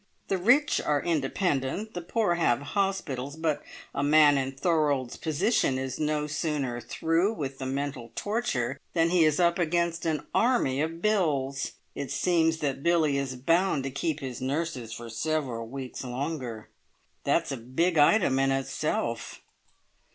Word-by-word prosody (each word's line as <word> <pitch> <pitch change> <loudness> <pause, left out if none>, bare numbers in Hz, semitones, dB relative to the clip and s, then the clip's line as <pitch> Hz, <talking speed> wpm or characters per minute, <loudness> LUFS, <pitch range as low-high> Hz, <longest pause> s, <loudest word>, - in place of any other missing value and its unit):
The 195 - +1
rich 255 +10 +4
are 150 -1 +2
independent, 165 +4 -1
the 175 - -4
poor 205 +1 +1
have 120 -9 +2
hospitals; 160 -9 -1
but 160 -2 -1 0.3
a - - -1
man 145 0 +6
in 135 0 -1
Thorold's 145 -4 +1
position 160 - +1
is 130 -1 -4
no 150 -1 0
sooner 145 -5 -2
through 165 - +1
with 135 -6 -5
the 130 - -3
mental 135 -3 -3
torture 140 - -1 0.2
than 165 0 +3
he 180 -2 +5
is 155 0 +3
up 170 0 +3
against 170 0 0
an 155 -3 -1
army 225 - +2
of 165 +2 -3
bills. 145 -10 +1 0.2
It 140 - -5
seems 165 -2 +2
that 140 -2 -1
Billie 155 -4 +2
is 135 -2 -3
bound 165 +3 +2
to 135 - -3
keep 155 +2 -2
his 130 -3 -5
nurses 135 -3 -2
for 115 +1 -7
several 115 -1 -2
weeks 130 +1 -6
longer. 125 -3 -4 0.5
That's 145 +2 +1
a 135 - -2
big 150 +8 0
item 145 -3 +4
in 135 0 +3
itself." 135 -3 -2
150 Hz, 150 wpm, -28 LUFS, 135-170 Hz, 0.5 s, man